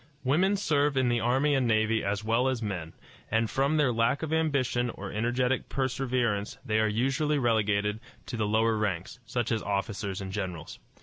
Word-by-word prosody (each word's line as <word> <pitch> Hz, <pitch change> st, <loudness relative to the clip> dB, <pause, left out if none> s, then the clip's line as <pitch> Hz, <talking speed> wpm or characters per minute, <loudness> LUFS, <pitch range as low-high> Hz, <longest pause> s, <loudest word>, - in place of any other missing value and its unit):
Women 175 Hz, +10 st, +3 dB
serve 145 Hz, -6 st, +1 dB
in 130 Hz, -2 st, +3 dB
the 120 Hz, 0 st, +2 dB
army 135 Hz, +5 st, +2 dB
and 130 Hz, -3 st, +2 dB
navy 110 Hz, 0 st, +2 dB
as 100 Hz, +1 st, -1 dB
well 115 Hz, +4 st, +2 dB
as 130 Hz, -3 st, -1 dB
men, 90 Hz, -6 st, -4 dB, 0.4 s
and 110 Hz, +1 st, +2 dB
from 140 Hz, +6 st, +1 dB
their 140 Hz, -5 st, +3 dB
lack 115 Hz, +6 st, +1 dB
of 160 Hz, 0 st, -2 dB
ambition 130 Hz, -6 st, +1 dB
or 100 Hz, -3 st, -7 dB
energetic 125 Hz, +4 st, 0 dB
perseverance 125 Hz, -5 st, -1 dB
they 110 Hz, -1 st, +1 dB
are 110 Hz, -, +3 dB
usually 135 Hz, +7 st, +1 dB
relegated 105 Hz, -4 st, +1 dB, 0.3 s
to 125 Hz, -, -5 dB
the 110 Hz, -2 st, 0 dB
lower 110 Hz, +1 st, +2 dB
ranks, 100 Hz, +1 st, -2 dB
such 120 Hz, -2 st, -2 dB
as 110 Hz, -2 st, +1 dB
officers 100 Hz, -1 st, -2 dB
and 95 Hz, -1 st, -5 dB
generals. 90 Hz, -5 st, -5 dB
115 Hz, 180 wpm, -28 LUFS, 105-130 Hz, 0.4 s, Women